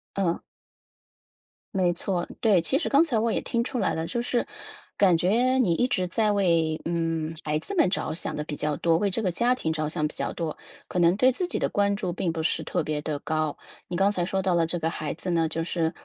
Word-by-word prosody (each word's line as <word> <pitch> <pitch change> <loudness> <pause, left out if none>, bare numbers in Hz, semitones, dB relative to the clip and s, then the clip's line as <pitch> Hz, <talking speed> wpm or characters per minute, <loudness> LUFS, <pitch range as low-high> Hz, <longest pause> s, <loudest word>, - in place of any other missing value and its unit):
嗯。 180 -4 0 1.4
没 185 -2 +3
错， 175 0 -2
对。 205 -7 +4
其 265 - +1
实 320 - -2
刚 285 +2 +5
才 285 -9 0
我 225 +1 +1
也 - - 0
听 235 -1 -1
出 250 0 -3
来 190 -6 +1
了， 160 0 -2
就 235 +8 -2
是 240 0 0 0.5
感 185 -4 +4
觉 235 +9 +2
你 210 -10 +3
一 245 +9 +2
直 185 -8 0
在 215 +3 +1
为， 170 -6 +2
嗯， 165 -1 -1
孩 150 0 0
子 400 - -5
们 330 - +4
着 190 - -2
想 165 - -2
地 150 - -2
比 150 0 -5
较 150 0 -1
多， 165 -1 +2
为 205 - +1
这 220 +4 -1
个 185 - +1
家 240 +7 +2
庭 160 -10 -2
着 155 -1 -1
想 155 -1 0
比 - - -9
较 - - -2
多， 165 -3 -3 0.3
可 180 - -2
能 175 +2 +4
对 255 +4 +5
自 350 +8 -2
己 - - -3
的 - - +1
关 200 0 +1
注 185 -4 -3
并 170 -1 -1
不 160 -1 -3
是 - - 0
特 - - -1
别 150 -1 -2
地 150 -1 -3
高。 155 -1 -1 0.3
你 175 - -3
刚 195 +1 +4
才 180 -4 -1
说 190 +2 -1
到 185 -1 +2
了 170 -1 +2
这 175 - 0
个 165 0 -1
孩 155 -3 -4
子 185 - -4
呢 165 -2 +2
就 165 +1 -2
是， 165 -1 0
175 Hz, 265 characters per minute, -26 LUFS, 160-205 Hz, 1.4 s, 刚